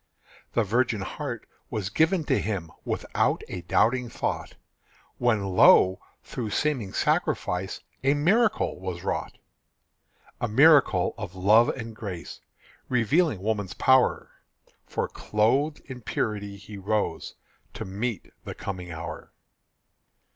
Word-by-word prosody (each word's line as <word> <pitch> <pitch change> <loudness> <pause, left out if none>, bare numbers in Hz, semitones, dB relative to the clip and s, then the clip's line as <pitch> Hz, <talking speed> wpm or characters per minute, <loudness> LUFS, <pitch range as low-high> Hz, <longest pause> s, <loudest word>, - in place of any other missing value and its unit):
The 115 - +3
virgin 115 0 +1
heart 120 +4 -5 0.2
was 100 -4 -3
given 160 - +2
to - - +1
him 95 -7 -3
Without - - -1
a 90 - -6
doubting 120 +7 +1
thought, - - -3 0.6
When, 120 -5 +2
lo! 95 -1 +5 0.2
through 115 -4 -5
seeming 125 -5 -1
sacrifice 90 0 -1 0.2
A 140 +2 +3
miracle 200 - +2
was 90 -2 -5
wrought; - - -3 1.0
A 120 - 0
miracle 140 +6 +5
of 90 - -6
love 105 +5 +5
and 115 -3 -5
grace, 95 -6 -7 0.5
Revealing 125 - +2
woman's 105 -4 -2
power; 130 -1 +3 0.6
For, - - -2
clothed 130 +9 0
in 130 -2 -9
purity, 105 -2 -3
he 105 0 -10
rose 105 +2 -2 0.4
To - - -5
meet 105 +4 -4
the - - -7
coming 90 -3 -6
hour. 80 +1 -7
110 Hz, 120 wpm, -26 LUFS, 95-130 Hz, 1.0 s, lo